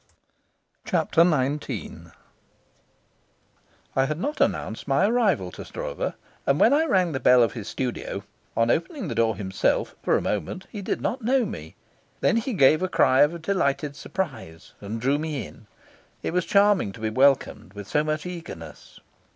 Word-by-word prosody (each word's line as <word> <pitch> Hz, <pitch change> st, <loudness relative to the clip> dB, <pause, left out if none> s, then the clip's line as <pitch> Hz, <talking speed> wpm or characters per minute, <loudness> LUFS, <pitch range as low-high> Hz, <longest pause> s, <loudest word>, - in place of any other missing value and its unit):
Chapter 165 Hz, -, +2 dB
XIX 140 Hz, -, -1 dB, 1.9 s
I 135 Hz, -, +3 dB
had 155 Hz, +2 st, -2 dB
not 290 Hz, -, -2 dB
announced -, -, -1 dB
my -, -, +3 dB
arrival 200 Hz, -, +1 dB
to -, -, -8 dB
Stroeve, -, -, -4 dB, 0.3 s
and 140 Hz, +1 st, +3 dB
when 235 Hz, -, +6 dB
I 310 Hz, +3 st, +3 dB
rang 185 Hz, -, +2 dB
the 135 Hz, -, -2 dB
bell 125 Hz, -1 st, +6 dB
of 115 Hz, -, 0 dB
his 110 Hz, -3 st, -7 dB
studio, 125 Hz, 0 st, -4 dB, 0.3 s
on 115 Hz, +1 st, +3 dB
opening 210 Hz, -, -2 dB
the -, -, -2 dB
door 115 Hz, -1 st, +2 dB
himself, 95 Hz, 0 st, 0 dB
for -, -, +2 dB
a -, -, -2 dB
moment 105 Hz, -, -3 dB
he 210 Hz, -, -6 dB
did -, -, -2 dB
not 255 Hz, -, -2 dB
know 250 Hz, +2 st, +2 dB
me. 80 Hz, -, -8 dB, 0.4 s
Then 230 Hz, -, +2 dB
he 235 Hz, +3 st, -1 dB
gave 155 Hz, -2 st, +5 dB
a 185 Hz, -, +1 dB
cry 130 Hz, -6 st, +4 dB
of 160 Hz, +3 st, +2 dB
delighted 145 Hz, -6 st, 0 dB
surprise 135 Hz, -, -6 dB
and 105 Hz, +3 st, -5 dB
drew 135 Hz, +5 st, +1 dB
me 155 Hz, -3 st, -3 dB
in. 110 Hz, -, -15 dB, 0.6 s
It -, -, -2 dB
was 180 Hz, -1 st, +1 dB
charming 200 Hz, -, +3 dB
to 115 Hz, -, -12 dB
be 110 Hz, 0 st, -2 dB
welcomed 130 Hz, -7 st, +2 dB
with 100 Hz, -1 st, -8 dB
so 150 Hz, +9 st, +1 dB
much 155 Hz, +1 st, -2 dB
eagerness. 165 Hz, -, -9 dB
145 Hz, 165 wpm, -25 LUFS, 115-185 Hz, 1.9 s, when